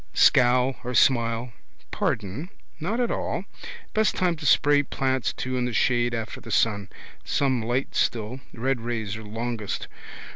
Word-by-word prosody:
Scowl 125 Hz, +1 st, +4 dB
or 125 Hz, 0 st, -3 dB
smile. 115 Hz, -2 st, +3 dB, 0.4 s
Pardon! 105 Hz, -, -2 dB, 0.3 s
Not 200 Hz, +9 st, -2 dB
at 240 Hz, -1 st, +1 dB
all. -, -, -2 dB, 0.5 s
Best 220 Hz, 0 st, +2 dB
time 180 Hz, -2 st, +1 dB
to 150 Hz, -2 st, -3 dB
spray 145 Hz, +1 st, +5 dB
plants 130 Hz, -2 st, -1 dB
too 130 Hz, 0 st, -3 dB
in 125 Hz, -, 0 dB
the 125 Hz, -, -2 dB
shade 120 Hz, +1 st, +2 dB
after 115 Hz, -1 st, -5 dB
the 115 Hz, -, -11 dB
sun. 100 Hz, -3 st, +1 dB, 0.3 s
Some 130 Hz, -4 st, +1 dB
light 120 Hz, +4 st, -1 dB
still. 115 Hz, +3 st, 0 dB
Red 130 Hz, +1 st, -1 dB
rays 110 Hz, -3 st, -3 dB
are 110 Hz, -, -8 dB
longest. 115 Hz, 0 st, -4 dB
120 Hz, 150 wpm, -25 LUFS, 115-135 Hz, 0.5 s, spray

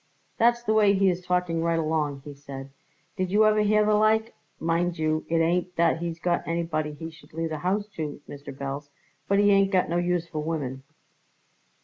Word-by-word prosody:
"That's 240 Hz, +1 st, +3 dB
the 220 Hz, -, +1 dB
way 210 Hz, -2 st, +5 dB
he 195 Hz, -1 st, +4 dB
is 180 Hz, 0 st, -4 dB
talking 180 Hz, -2 st, 0 dB
right 165 Hz, 0 st, +1 dB
along," 155 Hz, -3 st, -1 dB
he 145 Hz, -, -7 dB
said. 140 Hz, -1 st, -9 dB, 0.5 s
"Did 185 Hz, -1 st, -1 dB
you 210 Hz, +3 st, +4 dB
ever 215 Hz, 0 st, +4 dB
hear 210 Hz, 0 st, +3 dB
the 215 Hz, -, +3 dB
like? 220 Hz, +2 st, +3 dB, 0.3 s
Mind 170 Hz, +1 st, 0 dB
you, 155 Hz, 0 st, -1 dB
it 165 Hz, -, +2 dB
ain't 175 Hz, +2 st, 0 dB
that 165 Hz, -1 st, +2 dB
he's 170 Hz, -1 st, -4 dB
got 175 Hz, 0 st, 0 dB
anybody 165 Hz, -2 st, -1 dB
he 160 Hz, +2 st, -7 dB
should 155 Hz, -2 st, -18 dB
leave 165 Hz, +1 st, -2 dB
the 155 Hz, -1 st, -4 dB
house 195 Hz, +5 st, 0 dB
to, 150 Hz, -3 st, -4 dB
Mr. 140 Hz, 0 st, -9 dB
Belz, 140 Hz, +1 st, -6 dB, 0.4 s
but 200 Hz, -, +2 dB
he 205 Hz, 0 st, +5 dB
ain't 195 Hz, -1 st, +4 dB
got 185 Hz, -4 st, +2 dB
no 170 Hz, -, 0 dB
use 175 Hz, -1 st, 0 dB
for 155 Hz, -2 st, -5 dB
women." 145 Hz, -5 st, -3 dB
170 Hz, 205 wpm, -26 LUFS, 155-195 Hz, 0.5 s, way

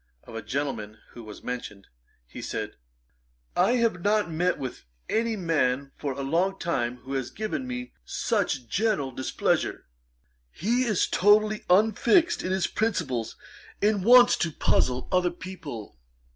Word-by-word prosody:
Of -, -, -13 dB
a 115 Hz, -, -4 dB
gentleman 110 Hz, -3 st, -3 dB
who 120 Hz, -, -10 dB
was 105 Hz, -1 st, -11 dB
mentioned, 120 Hz, -5 st, -6 dB, 0.4 s
he -, -, -9 dB
said, -, -, -4 dB, 0.8 s
'I -, -, +4 dB
have 230 Hz, -7 st, +1 dB
not 205 Hz, -2 st, +1 dB
met 175 Hz, +3 st, +1 dB
with 130 Hz, -4 st, -6 dB, 0.2 s
any 225 Hz, 0 st, 0 dB
man 140 Hz, -7 st, 0 dB
for 140 Hz, -2 st, -3 dB
a 140 Hz, +1 st, -5 dB
long 175 Hz, +7 st, +1 dB
time 125 Hz, -10 st, -1 dB
who 135 Hz, +2 st, -7 dB
has 130 Hz, -2 st, -2 dB
given 220 Hz, +5 st, -4 dB
me 250 Hz, 0 st, -5 dB
such 160 Hz, -, -1 dB
general 195 Hz, -, 0 dB
displeasure. 130 Hz, +1 st, -1 dB, 0.7 s
He 240 Hz, +8 st, 0 dB
is 215 Hz, -6 st, +2 dB
totally 210 Hz, +2 st, +3 dB
unfixed 220 Hz, -, +4 dB
in 185 Hz, -, -3 dB
his 190 Hz, -1 st, +1 dB
principles, 160 Hz, -, -1 dB, 0.4 s
and 205 Hz, -2 st, +2 dB
wants 245 Hz, +3 st, +8 dB
to 170 Hz, -, 0 dB
puzzle 125 Hz, -3 st, +1 dB
other 180 Hz, -1 st, +3 dB
people. 160 Hz, -, -8 dB
175 Hz, 145 wpm, -26 LUFS, 130-215 Hz, 0.8 s, wants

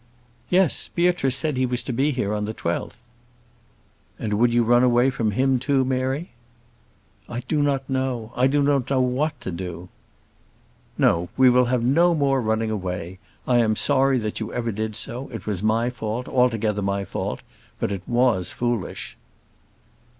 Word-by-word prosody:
"Yes. 180 Hz, -3 st, +2 dB
Beatrice 170 Hz, -7 st, +1 dB
said 150 Hz, -4 st, -1 dB
he 130 Hz, 0 st, +1 dB
was 125 Hz, 0 st, -2 dB
to 130 Hz, -, -4 dB
be 135 Hz, +5 st, +1 dB
here 125 Hz, -7 st, -1 dB
on 105 Hz, 0 st, -1 dB
the 110 Hz, +1 st, -5 dB
12th." 85 Hz, +6 st, -4 dB, 1.2 s
"And 105 Hz, -, -3 dB
would 120 Hz, +3 st, +3 dB
you 120 Hz, 0 st, +3 dB
run 120 Hz, +1 st, +4 dB
away 125 Hz, +1 st, +4 dB
from 115 Hz, -4 st, -1 dB
him 130 Hz, +4 st, +1 dB
too, 135 Hz, 0 st, +1 dB
Mary?" 130 Hz, +5 st, -2 dB, 1.0 s
"I 120 Hz, 0 st, -4 dB
do 150 Hz, +3 st, -1 dB
not 135 Hz, -2 st, 0 dB
know: 130 Hz, -4 st, -2 dB
I 125 Hz, +1 st, +3 dB
do 145 Hz, +1 st, +2 dB
not 140 Hz, -3 st, +1 dB
know 135 Hz, -1 st, +2 dB
what 130 Hz, +5 st, 0 dB
to 95 Hz, -, -5 dB
do." 90 Hz, 0 st, -6 dB, 1.1 s
"No; 85 Hz, +1 st, +2 dB
we 130 Hz, -1 st, +6 dB
will 125 Hz, 0 st, +4 dB
have 120 Hz, -1 st, 0 dB
no 170 Hz, +7 st, +4 dB
more 135 Hz, -3 st, +2 dB
running 110 Hz, 0 st, 0 dB
away: 90 Hz, -3 st, -4 dB, 0.3 s
I 125 Hz, -1 st, +4 dB
am 110 Hz, -2 st, +2 dB
sorry 135 Hz, +2 st, +3 dB
that 110 Hz, -3 st, -3 dB
you 110 Hz, -1 st, -4 dB
ever 115 Hz, -1 st, -2 dB
did 110 Hz, +1 st, -3 dB
so. 120 Hz, +4 st, -2 dB
It 115 Hz, -5 st, -8 dB
was 100 Hz, -4 st, -2 dB
my 115 Hz, +3 st, +1 dB
fault, 120 Hz, +1 st, -4 dB
altogether 115 Hz, -5 st, +1 dB
my 100 Hz, 0 st, -1 dB
fault; -, -, -4 dB, 0.4 s
but -, -, -1 dB
it 100 Hz, -2 st, -3 dB
was 120 Hz, -7 st, +2 dB
foolish." 120 Hz, -5 st, -3 dB
120 Hz, 170 wpm, -23 LUFS, 110-135 Hz, 1.2 s, we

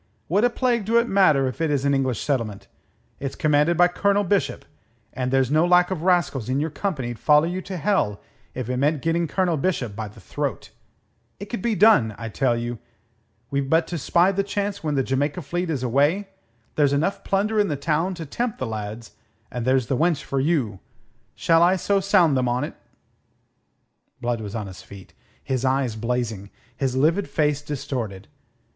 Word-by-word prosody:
What 200 Hz, +6 st, +2 dB
a 245 Hz, -, +5 dB
plague 240 Hz, -3 st, 0 dB
do 230 Hz, +3 st, +2 dB
it 235 Hz, 0 st, +3 dB
matter 155 Hz, -, +4 dB
if 130 Hz, -, -5 dB
it 160 Hz, -, +1 dB
is 140 Hz, -2 st, 0 dB
an 140 Hz, -, +3 dB
English 130 Hz, -4 st, 0 dB
settlement? 115 Hz, -8 st, -2 dB, 0.5 s
It's 135 Hz, -1 st, -4 dB
commanded 150 Hz, +2 st, +2 dB
by 175 Hz, 0 st, +6 dB
Colonel 200 Hz, +3 st, +1 dB
Bishop, 200 Hz, +1 st, 0 dB, 0.5 s
and 125 Hz, -1 st, -2 dB
there's 135 Hz, 0 st, +2 dB
no 155 Hz, +2 st, +4 dB
lack 180 Hz, +1 st, +4 dB
of 180 Hz, -4 st, -2 dB
rascals 170 Hz, -, +1 dB
in 130 Hz, +2 st, +1 dB
your 155 Hz, +2 st, -2 dB
company'd 135 Hz, -, -3 dB
follow 150 Hz, +1 st, +4 dB
you 180 Hz, +2 st, -3 dB
to 185 Hz, 0 st, -6 dB
hell 170 Hz, -, 0 dB, 0.4 s
if 125 Hz, -3 st, -4 dB
it 125 Hz, 0 st, -2 dB
meant 145 Hz, +2 st, +1 dB
getting 165 Hz, +1 st, +1 dB
Colonel 175 Hz, 0 st, 0 dB
Bishop 135 Hz, -, -1 dB
by 110 Hz, 0 st, -4 dB
the 105 Hz, +2 st, -14 dB
throat. 95 Hz, -, -4 dB, 0.7 s
It 200 Hz, -, -8 dB
could 235 Hz, -, -3 dB
be 230 Hz, 0 st, 0 dB
done, 170 Hz, -, +5 dB
I 115 Hz, -1 st, -6 dB
tell 120 Hz, +1 st, +1 dB
you. 120 Hz, -1 st, -4 dB, 0.7 s
We've 140 Hz, -1 st, -1 dB
but 160 Hz, +1 st, +3 dB
to 170 Hz, -, -3 dB
spy 175 Hz, +7 st, +3 dB
the 200 Hz, 0 st, 0 dB
chance 200 Hz, 0 st, -3 dB
when 150 Hz, -2 st, -1 dB
the 135 Hz, -, +2 dB
Jamaica 145 Hz, +6 st, -1 dB
fleet 175 Hz, +4 st, -3 dB
is 140 Hz, -5 st, -2 dB
away. 145 Hz, -, +1 dB, 0.5 s
There's 145 Hz, -2 st, +3 dB
enough 165 Hz, +8 st, 0 dB
plunder 210 Hz, +2 st, 0 dB
in 205 Hz, -, +3 dB
the 150 Hz, -, -1 dB
town 160 Hz, +6 st, 0 dB
to 165 Hz, -2 st, -6 dB
tempt 235 Hz, -, -3 dB
the 130 Hz, -, -3 dB
lads, 110 Hz, 0 st, -6 dB, 0.4 s
and 120 Hz, -2 st, -4 dB
there's 130 Hz, -1 st, +3 dB
the 130 Hz, -, -1 dB
wench 160 Hz, +1 st, +1 dB
for 135 Hz, -, -2 dB
you. 130 Hz, -, 0 dB, 0.6 s
Shall 165 Hz, 0 st, +3 dB
I 175 Hz, +2 st, +5 dB
sound 190 Hz, -5 st, +3 dB
them 125 Hz, -1 st, +1 dB
on 125 Hz, +1 st, 0 dB
't?" -, -, -5 dB, 1.5 s
Blood 120 Hz, -2 st, -2 dB
was 105 Hz, 0 st, -6 dB
on 110 Hz, -2 st, -3 dB
his 95 Hz, -2 st, -10 dB
feet, 100 Hz, -2 st, -13 dB, 0.3 s
his 130 Hz, -3 st, -2 dB
eyes 130 Hz, -3 st, +1 dB
blazing, 115 Hz, -3 st, -3 dB, 0.3 s
his 130 Hz, -2 st, -1 dB
livid 165 Hz, +9 st, +2 dB
face 150 Hz, -2 st, +1 dB
distorted. 125 Hz, -9 st, -5 dB
145 Hz, 190 wpm, -23 LUFS, 125-180 Hz, 1.5 s, by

